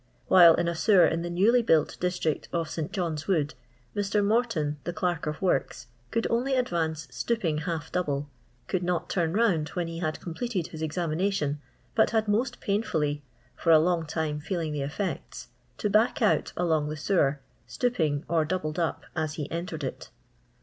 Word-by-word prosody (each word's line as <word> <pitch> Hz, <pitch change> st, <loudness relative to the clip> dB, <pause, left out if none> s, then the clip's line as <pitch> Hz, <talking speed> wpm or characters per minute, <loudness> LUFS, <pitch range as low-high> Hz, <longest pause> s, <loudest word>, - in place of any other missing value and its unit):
While 170 Hz, -3 st, +8 dB
in 175 Hz, -, 0 dB
a 170 Hz, -, 0 dB
sewer 180 Hz, +3 st, +5 dB
in 165 Hz, +1 st, 0 dB
the 175 Hz, -, -3 dB
newly 210 Hz, +8 st, +4 dB
built 160 Hz, -9 st, +2 dB
district 175 Hz, -4 st, -1 dB
of 165 Hz, -3 st, -2 dB
St 160 Hz, +2 st, -3 dB
John'a 170 Hz, -6 st, -2 dB
wood, 155 Hz, -7 st, +1 dB, 0.4 s
Mr. 205 Hz, 0 st, +1 dB
Morton, 200 Hz, -10 st, +1 dB
the 175 Hz, -, -3 dB
Clerk 175 Hz, -2 st, -1 dB
of 150 Hz, 0 st, -3 dB
Works, 175 Hz, -7 st, 0 dB, 0.2 s
could 230 Hz, 0 st, -1 dB
only 255 Hz, +4 st, +1 dB
advance 165 Hz, -10 st, -1 dB
stooping 180 Hz, -10 st, -1 dB
half 160 Hz, -2 st, -4 dB
double, 145 Hz, -5 st, -1 dB, 0.4 s
could 185 Hz, -, -1 dB
not 175 Hz, -1 st, -1 dB
turn 170 Hz, -3 st, +1 dB
round 185 Hz, -9 st, +2 dB
when 175 Hz, -2 st, -1 dB
he 165 Hz, +1 st, -5 dB
oad 155 Hz, 0 st, -2 dB
completed 180 Hz, 0 st, -3 dB
his 160 Hz, -, -8 dB
examination, 160 Hz, -1 st, -1 dB, 0.3 s
but 220 Hz, -, +4 dB
had 220 Hz, -2 st, +1 dB
most 220 Hz, +6 st, 0 dB
painfully 155 Hz, -8 st, 0 dB, 0.2 s
— 125 Hz, +1 st, -35 dB
for 165 Hz, -, +3 dB
along 165 Hz, +1 st, +4 dB
time 150 Hz, -1 st, -2 dB
feeling 160 Hz, -1 st, -3 dB
the 145 Hz, -, -2 dB
effects 150 Hz, +8 st, -4 dB
— -, -, -38 dB
to 210 Hz, -, -1 dB
back 215 Hz, +8 st, +3 dB
out 220 Hz, -4 st, +2 dB
along 160 Hz, -4 st, +1 dB
the 155 Hz, -, -4 dB
sewer, 150 Hz, -4 st, +1 dB, 0.3 s
stooping, 160 Hz, -, 0 dB
or 165 Hz, -1 st, +2 dB
doubled 155 Hz, 0 st, -2 dB
up, 165 Hz, -2 st, -1 dB
as 155 Hz, -2 st, -2 dB
he 150 Hz, -2 st, -5 dB
entered 165 Hz, -2 st, -4 dB
it. 130 Hz, -, -5 dB
170 Hz, 175 wpm, -27 LUFS, 155-195 Hz, 0.4 s, While